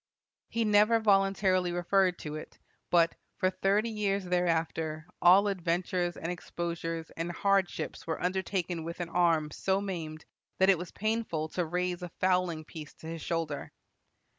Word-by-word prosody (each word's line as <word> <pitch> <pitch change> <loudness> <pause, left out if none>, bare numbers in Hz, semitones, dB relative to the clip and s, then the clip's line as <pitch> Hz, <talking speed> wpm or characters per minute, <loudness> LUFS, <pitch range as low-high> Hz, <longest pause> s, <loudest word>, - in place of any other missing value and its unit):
He 230 0 0
never 215 +2 +5
voluntarily 195 -3 +3
referred 180 +1 +2
to 150 - -5
it; 155 - -8 0.3
but 170 -1 +4 0.2
"for 185 - +2
thirty 200 +4 +1
years 200 -2 0
thereafter, 165 -3 0 0.2
all 190 +4 +7
adventures 175 -1 -1
and 165 - -3
exposures 170 -2 -4
and 165 +1 -4
hardships 195 0 0
were 160 - -2
undertaken 180 -2 -1
with 170 +2 -6
an 175 -1 -3
arm 165 -3 +2
so 190 +4 0
maimed 165 -6 -5 0.3
that 190 +1 +6
it 185 - +1
was 175 -1 -6
painful 215 -7 -2
to 180 - -1
raise 180 +1 -1
a 180 - -5
fowling 180 -4 +1
piece 155 -1 -10
to - - -14
his 165 -1 -5
shoulder." 165 -3 -3
180 Hz, 150 wpm, -30 LUFS, 165-195 Hz, 0.3 s, all